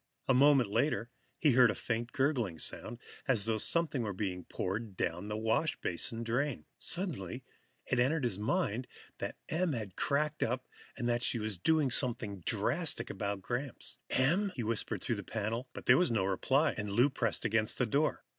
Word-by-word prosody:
A 135 - +4
moment 135 -4 +5
later, 115 -1 0 0.3
he 150 - +4
heard 125 -1 +6
a 105 - -1
faint 115 +1 -3
gurgling 130 - 0
sound, 115 +8 -2 0.3
as 115 -7 +3
though 110 -1 0
something 165 0 +1
were 105 -3 -2
being 95 -2 -3
poured 100 +1 -4
down 90 +4 -2
the 105 0 -3
washbasin 115 - 0
drain. 125 +4 -1
Suddenly, 135 - -1 0.4
it 125 - 0
entered 140 +4 +2
his 115 -6 0
mind 120 - 0 0.3
that - - -4
Em 165 0 0
had 105 -6 -5
cracked 150 +2 0
up, 125 +3 -1 0.3
that 120 0 0
she 120 - +3
was 110 -1 -1
in - - -4
there 85 - -32
doing 155 -5 +3
something 110 -7 +1
drastic 130 - 0
about 100 -1 -3
Gramps. 125 +4 -4
"Em?" 180 +10 +2
he 120 - -3
whispered 110 -3 -2
through 115 - -1
the 100 - -5
panel. 115 +5 -3 0.2
There - - +7
was 180 - +3
no 105 -5 +1
reply, 130 +10 +2
and 105 -2 -4
Lou 120 +8 +3
pressed 120 -4 0
against 110 -1 +2
the 125 - +2
door. 140 +7 0
120 Hz, 180 wpm, -32 LUFS, 105-140 Hz, 0.4 s, There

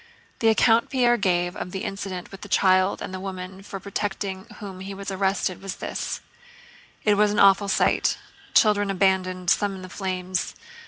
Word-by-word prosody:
The 225 - +2
account 225 +1 +4
Pierre 245 -2 +3
gave 175 -3 0
of 180 - -5
the 190 +1 -5
incident 195 -2 -5
with 195 - -10
the 205 - -9
child 185 0 +3
and - - -6
the 185 - -4
woman 190 0 -6
for 195 0 -7
protecting 195 -1 -4
whom 195 -4 -8
he 195 +1 -6
was 195 0 -5
arrested 190 -1 0
was 195 -1 -5
this: - - -4 0.8
"It 210 -1 +3
was 210 0 +4
an 210 - -1
awful 200 +1 +6
sight—children 205 +1 +1
abandoned, 185 -2 +1
some 205 -2 +1
in 185 - -9
the 185 - -8
flames... 185 -1 -3
195 Hz, 170 wpm, -24 LUFS, 185-205 Hz, 0.8 s, awful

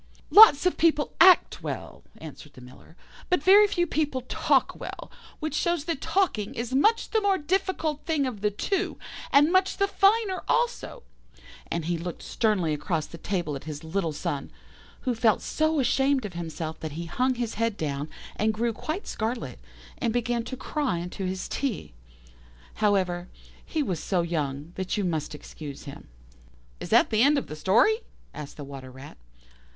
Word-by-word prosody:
"'Lots 410 -8 +9
of 365 - +1
people 315 -3 +2
act 370 +1 +6
well,' - - -6 0.2
answered 150 -1 -11
the 125 - -14
Miller; 125 +6 -15 0.3
'but 360 -5 +2
very 405 +4 +7
few 355 -4 0
people 295 -5 -1
talk 255 - +1
well, - - -8 0.3
which 310 -2 -3
shows 345 0 0
that 330 -5 -3
talking 325 - 0
is 235 +2 -4
much 430 - +2
the 440 - +2
more 400 -2 +2
difficult 325 -2 -1
thing 310 -4 0
of 235 -6 -5
the 210 - +2
two, 380 - -2 0.3
and 290 +4 +5
much 375 +1 +2
the 395 - +2
finer 400 -1 +2
thing - - -10
also'; 485 0 -1 0.7
and 170 -2 -2
he 170 0 -1
looked 175 0 -6
sternly 195 -8 0
across 155 +1 -2
the 170 - -11
table 175 -7 -2
at 135 - -8
his 150 -1 -7
little 165 +1 -2
son, 145 -1 -4 0.5
who 255 - 0
felt 225 -1 +3
so 315 0 0
ashamed 270 -1 +2
of 195 - -6
himself 160 -1 -5
that 155 -2 -6
he 170 +3 -5
hung 255 +9 0
his 235 -2 -3
head 230 -1 -1
down, 145 -1 -3 0.3
and 215 +1 +1
grew 230 +1 0
quite 315 - -4
scarlet, 220 - -4 0.4
and 225 - 0
began 240 -1 0
to 260 - -6
cry 275 - -2
into 180 +3 -5
his 185 0 -3
tea. 255 - -3 0.9
However, 185 -4 +1 0.3
he 315 -2 -2
was 180 - -2
so 180 -3 0
young 150 -2 -3
that 190 +1 -2
you 205 - 0
must 160 -4 -2
excuse 145 -1 -9
him." 140 0 -10 0.7
"Is - - -7
that - - +4
the 215 0 +3
end 285 +3 +5
of 275 - -1
the 155 - -8
story?" 225 - +3 0.4
asked 150 -1 -9
the 145 - -7
Water 135 -2 -9
rat. 130 - -12
220 Hz, 175 wpm, -26 LUFS, -, 0.9 s, Lots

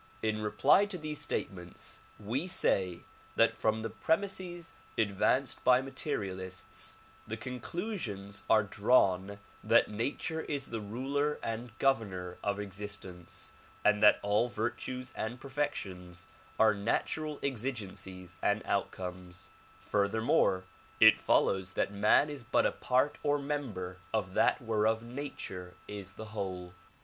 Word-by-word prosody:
In 110 -1 0
reply 145 - +4
to 200 -3 -5
these 150 -2 -4
statements, 90 -11 -4 0.2
we 120 - -2
say 95 - +1 0.3
that - - +4
from 110 0 +1
the 115 - -2
premises 175 - -1 0.2
advanced 115 +5 +2
by 125 0 +6
materialists, 95 -9 -5 0.3
the 110 - -3
conclusions 120 - -4
are 110 -1 +6
drawn 100 -2 +3 0.3
that - - +4
nature 145 +9 -2
is 140 -4 -3
the 115 -2 -2
ruler 135 +8 -1
and 115 +1 -4
governor 95 -9 0
of 100 -1 0
existence 95 -3 -6 0.3
and 105 0 +5
that 105 - +8
all 105 +4 +3
virtues 120 +3 -3
and 120 +3 -3
per 140 - -9
fections 90 -12 -3 0.3
are 110 -1 +6
natural 145 +9 -1
exigencies 100 -8 -4
and 105 +1 +2
outcomes; 90 -1 -3 0.3
furthermore 100 -2 +2 0.4
it - - +9
follows 95 -1 +2
that 100 - 0
man 105 +8 +5
is 145 -3 -6
but 120 +1 +2
a - - +3
part 130 +3 +1
or 145 -1 +2
member 130 -11 -3 0.2
of 95 -4 -1
that - - +3
whereof 110 0 +2
nature 120 -8 -6
is 100 -2 -6
the 110 - -8
whole. 95 -4 -4
110 Hz, 125 wpm, -32 LUFS, 95-135 Hz, 0.4 s, it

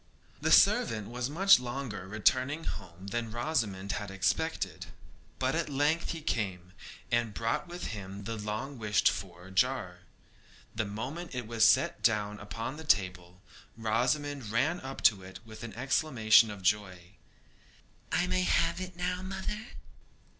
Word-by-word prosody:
The - - +1
servant 110 -2 +4
was 125 +2 -3
much 195 +4 +6
longer 120 -6 -5
returning 130 +9 +1
home 90 - -7
than 115 +3 -3
Rosamond 110 -6 -1
had 105 +1 -4
expected; 95 -2 -1 0.5
but - - 0
at - - -1
length 145 +4 +1
he 165 - -4
came, 95 - -2 0.4
and 120 -3 +1
brought 115 +8 -1
with 175 +1 -6
him 100 -1 -7
the 115 +3 -4
long 110 +6 -4
wished 105 -1 +2
for 90 -1 -8
jar. 95 -5 0 0.7
The 110 -1 -1
moment 130 +11 -5
it 125 -2 -3
was 115 0 +3
set - - +2
down 105 -1 +1
upon 115 +6 -5
the 160 - -8
table, 90 - 0 0.3
Rosamond 125 +3 0
ran 135 +10 +1
up 135 0 -7
to 100 -4 +5
it 95 0 -10
with 110 0 -11
an 115 -3 -7
exclamation 120 -4 +4
of 100 -2 -8
joy. 95 -3 0 1.0
'I 175 - +2
may 185 0 +1
have 175 -1 +2
it 185 -1 -6
now, 180 +1 -2
mother?' 190 +4 -5
115 Hz, 145 wpm, -30 LUFS, 100-145 Hz, 1.0 s, much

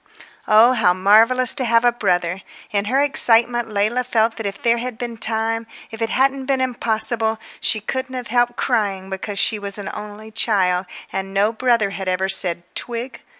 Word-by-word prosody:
Oh, 220 +4 +6
how 205 -7 +2
marvellous 225 +6 +4
to 270 - -1
have 230 0 +2
a 240 - +5
brother! 180 -5 -1 0.3
In 200 -1 0
her 255 +6 +1
excitement 240 -4 +2
Leila 215 +5 0
felt 225 -2 0
that 225 -3 -3
if 200 0 -6
there 235 0 +1
had 245 -1 -5
been 240 -1 -5
time, 225 0 -2 0.2
if 225 0 -9
it 225 - 0
hadn't 265 +1 0
been 270 -1 +1
impossible, 225 -3 0 0.2
she 220 - +1
couldn't 260 +4 -5
have 250 -3 -6
helped 240 +1 +1
crying 195 -3 -2
because 195 +1 -5
she 210 +2 +2
was 200 0 -5
an 200 -2 -6
only 210 +1 -9
child, 190 -5 +1 0.3
and 195 0 -4
no 205 +3 +2
brother 230 -4 +1
had 195 -1 -6
ever 185 +1 0
said 175 -3 +4
"Twig?" 235 0 -5
225 Hz, 185 wpm, -20 LUFS, 200-240 Hz, 0.3 s, Oh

